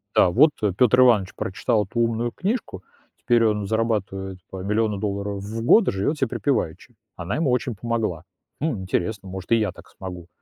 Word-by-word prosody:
да: -, -, +6 dB
вот, 145 Hz, -, +5 dB
э, 105 Hz, -2 st, +2 dB
Пётр 125 Hz, +4 st, +4 dB
Иванович 110 Hz, -7 st, +4 dB
прочитал 105 Hz, +2 st, 0 dB
эту 115 Hz, +5 st, -4 dB
умную 115 Hz, 0 st, 0 dB
книжку, 190 Hz, -, -3 dB, 0.3 s
теперь 120 Hz, -1 st, +2 dB
он 105 Hz, -2 st, +1 dB
зарабатывает 100 Hz, -4 st, -1 dB
по 95 Hz, -, -7 dB
миллиону 105 Hz, +1 st, 0 dB
долларов 100 Hz, 0 st, -3 dB
в 110 Hz, +3 st, -5 dB
год, 215 Hz, -, +6 dB
и -, -, +3 dB
живёт 100 Hz, +11 st, -1 dB
себе 135 Hz, -, +1 dB
припеваючи, 125 Hz, -, -2 dB, 0.2 s
она 90 Hz, +3 st, -4 dB
ему 155 Hz, -3 st, +1 dB
очень 125 Hz, -1 st, 0 dB
помогла. 110 Hz, -7 st, -2 dB, 0.4 s
Хм, 145 Hz, -10 st, -1 dB
интересно, 95 Hz, +2 st, -2 dB
может 95 Hz, +3 st, -8 dB
и -, -, +7 dB
я 105 Hz, -4 st, 0 dB
так -, -, -16 dB
смогу. 90 Hz, -3 st, -9 dB
105 Hz, 185 wpm, -23 LUFS, 95-120 Hz, 0.4 s, и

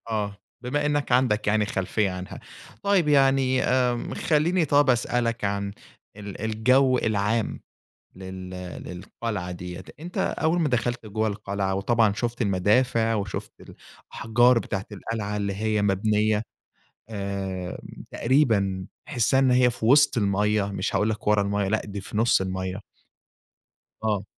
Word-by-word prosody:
آه، 105 Hz, -2 st, -2 dB, 0.2 s
بما 145 Hz, +4 st, -1 dB
إنّك 145 Hz, -2 st, 0 dB
عندك 120 Hz, -5 st, +2 dB
يعني 105 Hz, 0 st, +2 dB
خلفية 100 Hz, +1 st, -1 dB
عنها، 90 Hz, 0 st, -7 dB, 0.4 s
طيب 200 Hz, -5 st, +3 dB
يعني 135 Hz, -2 st, +3 dB
آمم 125 Hz, -2 st, 0 dB
خلّيني 165 Hz, +3 st, +1 dB
طَب 145 Hz, -1 st, +3 dB
أسألك 120 Hz, -2 st, 0 dB
عن 100 Hz, 0 st, -2 dB, 0.5 s
ال 100 Hz, -1 st, -8 dB
الجو 125 Hz, +4 st, +3 dB
العام 110 Hz, 0 st, 0 dB, 0.5 s
لل 95 Hz, 0 st, -8 dB, 0.3 s
للقلعة 90 Hz, +1 st, -5 dB
ديّة، 90 Hz, +1 st, -7 dB, 0.2 s
أنت 175 Hz, +4 st, -7 dB
أول 175 Hz, -2 st, +1 dB
ما 160 Hz, -, +2 dB
دخلت 120 Hz, -2 st, -1 dB
جُوّه 110 Hz, +1 st, -1 dB
القلعة 100 Hz, -1 st, -2 dB
وطبعًا 110 Hz, +2 st, +2 dB
شُفت 120 Hz, +3 st, -2 dB
المدافع، 115 Hz, +4 st, +2 dB
وشُفت 100 Hz, -2 st, -4 dB, 0.6 s
الأحجار 120 Hz, +2 st, +3 dB
بتاعة 100 Hz, -3 st, -4 dB
القلعة 105 Hz, 0 st, -4 dB
اللي 100 Hz, -1 st, -1 dB
هي 105 Hz, +1 st, 0 dB
مبنية 105 Hz, +2 st, +1 dB, 0.7 s
آآ 100 Hz, -3 st, -4 dB, 0.3 s
تقريبًا 110 Hz, -8 st, +1 dB, 0.2 s
تحسّها 130 Hz, -1 st, +2 dB
إنّ 135 Hz, -1 st, +3 dB
هي 125 Hz, 0 st, +5 dB
في 115 Hz, -, -5 dB
وسط 140 Hz, +2 st, +5 dB
المَيّة 105 Hz, 0 st, +1 dB
مش 100 Hz, -, -2 dB
هاقول 105 Hz, -, +2 dB
لك 110 Hz, -1 st, -4 dB
ورا 105 Hz, -1 st, +4 dB
المَيّة، 100 Hz, 0 st, 0 dB
لأ 110 Hz, +2 st, +1 dB
دي 100 Hz, -1 st, -6 dB
في 105 Hz, -, -6 dB
نُص 115 Hz, -2 st, +3 dB
المَيّة. 95 Hz, +1 st, -4 dB, 1.2 s
آه. 105 Hz, -3 st, 0 dB
110 Hz, 135 wpm, -25 LUFS, 100-125 Hz, 1.2 s, هي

